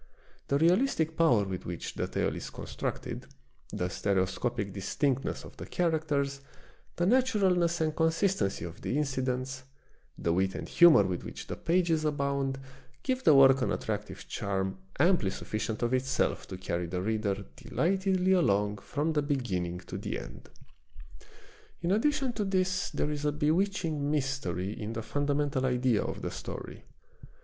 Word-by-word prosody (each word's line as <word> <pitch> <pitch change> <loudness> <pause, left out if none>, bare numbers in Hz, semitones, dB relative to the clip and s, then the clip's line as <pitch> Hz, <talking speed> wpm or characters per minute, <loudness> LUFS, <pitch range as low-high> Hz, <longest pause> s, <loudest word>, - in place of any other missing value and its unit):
The 140 - +2
realistic 165 - +2
power 140 -11 +4
with 95 -2 -5
which 85 -1 -5
the - - -2
tale - - -1
is - - -6
constructed, - - -5 0.4
the 90 - -1
stereoscopic 100 +2 -1
distinctness 130 +7 -1
of - - -12
the - - -7
characters, 150 -5 0 0.5
the 175 - +1
natu 255 +1 +3
ralness 175 -3 +2
and 155 -1 0
consistency 165 - +1
of 85 +3 -9
the 140 - -1
incidents, 130 -2 -1 0.6
the 85 - 0
wit 95 +2 +1
and - - -5
humor 170 -11 +7
with 95 -2 -2
which - - -7
the - - -5
pages 170 -2 +1
abound, 140 -2 0 0.4
give 260 0 -1
the 155 - +7
work 135 0 +7
an - - +1
attractive - - -4
charm 95 -1 -2 0.2
amply 170 - +4
sufficient 110 +3 -3
of 120 +1 +1
itself 130 0 0
to 95 - -6
carry 90 -2 -2
the 90 +1 -3
reader 105 -2 -1
delightedly 190 +1 +1
along 105 - +3
from 150 +9 -1
the 150 - +2
beginning 95 - -2
to - - -7
the - - -3
end. - - -10 1.3
In 170 - +1
addition 265 +4 +2
to 215 - -1
this 185 -2 0
there 150 - -1
is 145 -1 -3
a 150 - +2
bewitching 160 -1 0
mystery 130 - -1
in 105 +2 -4
the 115 -1 -4
fundamental 145 +1 0
idea 125 -3 +2
of - - -4
the - - -2
story. - - -7
140 Hz, 155 wpm, -30 LUFS, 105-170 Hz, 1.3 s, humor